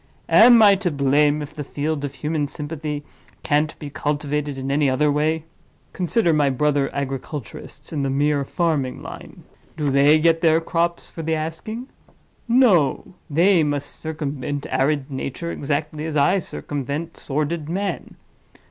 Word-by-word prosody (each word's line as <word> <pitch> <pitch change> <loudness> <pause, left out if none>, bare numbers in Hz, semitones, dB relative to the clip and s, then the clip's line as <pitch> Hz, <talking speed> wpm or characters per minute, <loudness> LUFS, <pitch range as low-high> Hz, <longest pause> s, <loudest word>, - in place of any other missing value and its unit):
Am 235 0 +8
I 205 -1 +8
to 190 -2 -1
blame 145 +1 +2
if 145 +1 -10
the 150 -1 -5
field 145 +1 -3
of 140 -1 -4
human 150 +1 -1
sympathy 150 0 -5 0.4
can't 150 +1 +1
be 145 -2 -8
cultivated 145 -1 -2
in 135 +1 -3
any 145 0 +2
other 145 +3 +2
way? 155 +2 0 0.5
Consult 190 +5 0
my 145 -2 +3
brother 140 +1 +1
agriculturists 135 +1 -6
in 150 - -1
the 135 - 0
mere 145 +1 +1
farming 150 -4 -1
line—do 150 -3 -7
they 140 +3 +5
get 165 +1 +3
their 160 -1 +4
crops 170 +1 -1
for 165 - -7
the 160 0 0
asking? 165 +10 -5 0.6
No! 205 - +3 0.2
they 170 +4 +4
must 145 -2 -1
circumvent 145 -3 -4
arid 140 0 0
Nature 135 +5 -4
exactly 150 +2 -3
as 155 -1 -2
I 165 +7 +4
circumvent 145 -1 -5
sordid 150 +2 -3
Man. 195 +1 -3
150 Hz, 145 wpm, -22 LUFS, 140-165 Hz, 0.6 s, Am